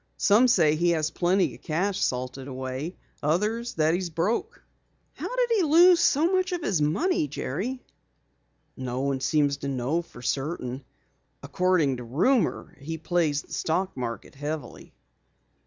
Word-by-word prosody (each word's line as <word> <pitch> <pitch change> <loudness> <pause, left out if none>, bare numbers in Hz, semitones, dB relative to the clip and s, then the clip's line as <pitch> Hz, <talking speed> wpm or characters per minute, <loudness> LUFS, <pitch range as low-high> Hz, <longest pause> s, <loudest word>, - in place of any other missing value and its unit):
Some 215 +5 +5
say 155 -10 +4
he 170 +2 +2
has 155 0 -1
plenty 180 +3 +1
of - - -14
cash 185 +4 -1
salted 130 +1 -3
away, 130 +5 -5 0.3
others 210 +10 0
that 155 0 +2
he's 180 0 -1
broke." 220 - -2 0.5
"How - - -5
did - - +1
he 415 - +3
lose 340 +2 +6
so 335 +1 +3
much 370 0 +1
of 345 -2 -3
his 180 -6 0
money, 160 - +1
Jerry?" 190 - -4 0.9
"No 130 0 -4
one 135 -1 -1
seems 145 +1 +1
to 140 - -5
know 135 +5 -1
for 125 -7 -14
certain. 135 -1 -3 0.6
According 180 -8 +1
to 125 - -7
rumor 180 - +1
he 160 +4 -5
plays 160 -3 0
the - - -13
stock 185 +4 -1
market 120 -3 -5
heavily." 145 -1 -6
160 Hz, 150 wpm, -26 LUFS, 140-210 Hz, 0.9 s, lose